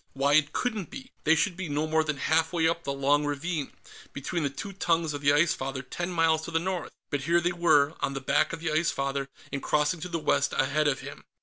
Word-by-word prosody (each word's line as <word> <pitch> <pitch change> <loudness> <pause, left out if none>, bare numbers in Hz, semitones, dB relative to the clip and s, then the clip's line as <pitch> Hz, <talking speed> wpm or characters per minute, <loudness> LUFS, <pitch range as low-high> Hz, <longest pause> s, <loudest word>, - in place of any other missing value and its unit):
Why, 140 +1 +2
it 145 0 +4
couldn't 220 -4 -2
be! 260 -1 -10
They 160 +1 +5
should 175 +3 +1
be 185 -3 -5
no 145 +2 0
more 160 0 +2
than 155 -2 -2
half 160 +3 +1
way 165 -2 +2
up 165 0 -1
the 140 - -1
long 140 +2 +2
ravine, 145 +1 -2 0.4
between 145 +5 -3
the 145 - 0
two 195 +9 -7
tongues 165 -4 0
of 145 - -5
the 145 0 +4
Ice 155 +3 +4
Father, 130 -1 -4
ten 175 +7 -4
miles 165 -2 +2
to - - -6
the 165 - 0
north. 180 +2 -2 0.2
But 140 -2 -2
here 170 +2 +4
they 175 +1 0
were, 155 -4 +3
on 135 - -2
the - - -2
back 130 - +2
of 165 - -6
the 165 -2 -1
Ice 160 +2 +2
Father 135 0 -2 0.2
and 140 - -2
crossing 150 +3 +1
to 180 - -6
the 170 - -1
west 155 - +1
ahead 145 +3 +2
of 135 -2 0
him. - - -9
155 Hz, 250 wpm, -28 LUFS, 140-170 Hz, 0.4 s, They